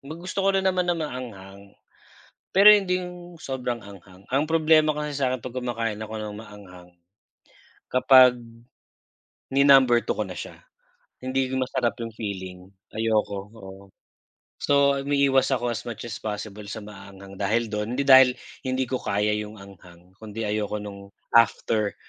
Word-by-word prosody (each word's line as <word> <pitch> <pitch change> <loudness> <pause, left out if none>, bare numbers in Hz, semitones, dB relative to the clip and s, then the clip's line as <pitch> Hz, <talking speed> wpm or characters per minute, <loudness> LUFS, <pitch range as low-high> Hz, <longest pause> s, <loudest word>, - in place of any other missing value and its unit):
gusto 170 +7 -8
ko 195 - +1
rin 190 - 0
naman 180 -1 +1
ng 170 -1 0
maanghang, 100 -9 -7 0.9
pero 200 +2 +8
hindi 190 -3 +3
'yong 175 -1 -10
sobrang 125 -3 -4
anghang. 95 -1 -14
Ang 140 +3 +1
problema 155 -1 +3
kasi 150 -1 -4
sa'kin 130 -3 -1
'pag 130 0 -8
kumakain 115 -4 -3
ako 110 +1 -7
ng 105 -1 -6
maanghang, 100 -5 -13 1.0
kapag 130 -1 +6 1.2
ni-number 135 -4 +5
2 - - -2
ko - - 0
na - - -8
siya, - - -8 0.7
hindi 130 0 -1
masarap 130 -2 -1
'yong 115 -1 -6
feeling, 95 -4 -6 0.4
ayoko, 110 -2 0 0.2
oo. 95 -1 -12 0.7
So, 140 -1 +2
umiiwas 140 -1 +2
ako 120 -1 -2
as 115 - -5
much 115 -2 -6
as 110 -2 -6
possible 105 -1 -6
sa 110 +1 -7
maaanghang 100 -1 -12
dahil 110 +3 0
'don, 105 +3 -3
hindi 140 - 0
dahil 130 -2 +7 0.3
hindi 130 0 0
ko 130 - -1
kaya 105 +1 -1
'yong 105 0 -5
anghang 90 -2 -16
kung 110 -2 -11
'di 115 - -4
ayoko 105 0 -2
no'ng 100 -1 -10 0.3
after 110 -2 +2
115 Hz, 150 wpm, -24 LUFS, 105-135 Hz, 1.2 s, pero